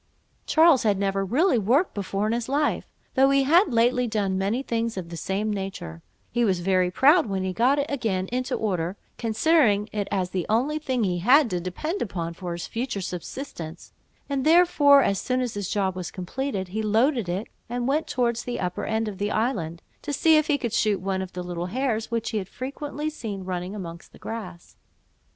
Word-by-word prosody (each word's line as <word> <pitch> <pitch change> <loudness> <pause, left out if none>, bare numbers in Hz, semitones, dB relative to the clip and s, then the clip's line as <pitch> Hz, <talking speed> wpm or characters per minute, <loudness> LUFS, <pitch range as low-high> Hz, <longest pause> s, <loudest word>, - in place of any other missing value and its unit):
Charles 320 -4 +5
had 205 -3 +2
never 195 0 0
really 255 - +2
worked 255 - +2
before 200 0 -2
in 215 - +1
his 235 +1 -2
life, 290 +2 0 0.3
though 270 0 +5
he 275 0 +4
had 335 +4 +4
lately 245 +2 +3
done 205 -4 0
many 200 +7 0
things 230 -3 -2
of 175 -3 -5
the 170 - -7
same 200 +5 -2
nature: 190 - -6 0.3
he 240 - +1
was 190 -5 +2
very 185 0 +2
proud 290 - +4
when 195 -2 -2
he 190 -1 -2
got 250 +7 +3
it 285 - +1
again 220 -9 -1
into 255 +1 -1
order, 185 -3 -2 0.2
considering 225 -3 +3
it 205 -2 -2
as 185 -3 -1
the 185 -3 -2
only 265 +8 +1
thing 260 -6 -1
he 180 -3 0
had 250 - +5
to 180 - 0
depend 305 - -4
upon 170 -5 -3
for 175 0 -5
his 170 0 -5
future 235 -2 -3
subsistence; 175 - -7 0.3
and 275 -2 -1
therefore, 305 -4 +6
as 195 - +1
soon 255 0 0
as 250 -3 -2
his 205 -2 -4
job 190 -3 0
was 180 -2 -4
completed, 190 +1 -4
he 215 +4 -2
loaded 225 0 +2
it, 190 +5 -2 0.2
and 245 +1 -2
went 300 +4 +1
towards 235 -2 0
the 245 - -4
upper 180 -1 -3
end 220 0 -1
of 200 -3 -6
the 205 +1 0
island, 185 -9 -1 0.2
to - - -4
see 315 +3 +4
if 305 0 +3
he 295 - +2
could 235 -5 -3
shoot 215 -4 +2
one 190 0 -2
of 190 -1 -7
the 180 - -5
little 175 0 -4
hares 230 0 -1
which 230 0 -2
he 220 - 0
had 190 -2 -7
frequently 290 +3 -5
seen 215 -10 -5
running 180 +1 -4
amongst 170 -4 -8
the - - -14
grass. 185 -6 -8
220 Hz, 205 wpm, -25 LUFS, 190-260 Hz, 0.3 s, therefore